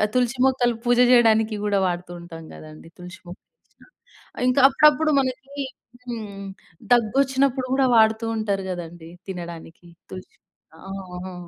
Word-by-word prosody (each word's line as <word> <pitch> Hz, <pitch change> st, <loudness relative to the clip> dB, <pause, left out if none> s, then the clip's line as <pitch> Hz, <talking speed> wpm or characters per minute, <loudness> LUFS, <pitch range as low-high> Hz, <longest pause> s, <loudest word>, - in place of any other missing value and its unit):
తులసి 250 Hz, 0 st, 0 dB
మొక్కలు 245 Hz, -3 st, +1 dB
పూజ 245 Hz, 0 st, +3 dB
జేయడానికి 225 Hz, -3 st, +4 dB
గూడా 200 Hz, -1 st, +1 dB
వాడుతుంటాం 175 Hz, -2 st, -7 dB
గదండీ! 155 Hz, +1 st, -13 dB
తులసి 180 Hz, +3 st, -11 dB
మొక్కలు 175 Hz, -, -13 dB, 0.2 s
ఎసిన. -, -, -23 dB, 0.6 s
ఇంకా 255 Hz, +2 st, +2 dB
అప్పుడప్పుడు 300 Hz, +2 st, +4 dB
మనకి 270 Hz, +2 st, -6 dB, 0.5 s
హ్మ్. 215 Hz, -4 st, -7 dB, 0.5 s
దగ్గొచ్చినప్పుడు 265 Hz, +2 st, +1 dB
గూడా 270 Hz, 0 st, +3 dB
వాడుతూ 220 Hz, 0 st, +3 dB
ఉంటారు 200 Hz, -3 st, -2 dB
గదండీ! 170 Hz, -2 st, -8 dB, 0.2 s
తినడానికి 170 Hz, -1 st, -9 dB, 0.2 s
తులసి 185 Hz, 0 st, -11 dB, 0.5 s
ఆహా! 185 Hz, -1 st, -8 dB
215 Hz, 115 wpm, -23 LUFS, 180-250 Hz, 0.6 s, జేయడానికి